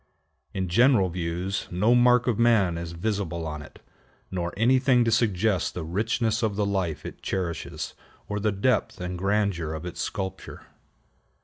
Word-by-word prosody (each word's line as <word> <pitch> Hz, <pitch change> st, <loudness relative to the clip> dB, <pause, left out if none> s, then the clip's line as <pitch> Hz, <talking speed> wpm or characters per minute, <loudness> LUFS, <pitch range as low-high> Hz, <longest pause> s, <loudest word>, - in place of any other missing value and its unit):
In 95 Hz, -1 st, -2 dB
general 110 Hz, +1 st, +4 dB
views 90 Hz, +2 st, -3 dB
no 105 Hz, +7 st, +3 dB
mark 125 Hz, 0 st, +5 dB
of 120 Hz, -4 st, 0 dB
man 110 Hz, -7 st, +4 dB
is 85 Hz, 0 st, -5 dB
visible 90 Hz, -3 st, -2 dB
on 75 Hz, -1 st, -5 dB
it, -, -, -14 dB, 0.5 s
nor 85 Hz, -2 st, -2 dB
anything 125 Hz, +2 st, +4 dB
to 115 Hz, -, +1 dB
suggest 105 Hz, -3 st, +1 dB
the 90 Hz, -, -3 dB
richness 110 Hz, +6 st, 0 dB
of 110 Hz, -3 st, 0 dB
the 105 Hz, 0 st, +1 dB
life 95 Hz, -6 st, -2 dB
it -, -, -8 dB
cherishes, 90 Hz, -3 st, -3 dB, 0.3 s
or 105 Hz, 0 st, -2 dB
the 105 Hz, +1 st, +1 dB
depth 100 Hz, +6 st, 0 dB
and 90 Hz, 0 st, -4 dB
grandeur 95 Hz, -4 st, 0 dB
of 80 Hz, +2 st, -7 dB
its 90 Hz, -, -5 dB
sculpture. 95 Hz, -2 st, -5 dB
95 Hz, 155 wpm, -26 LUFS, 85-110 Hz, 0.5 s, mark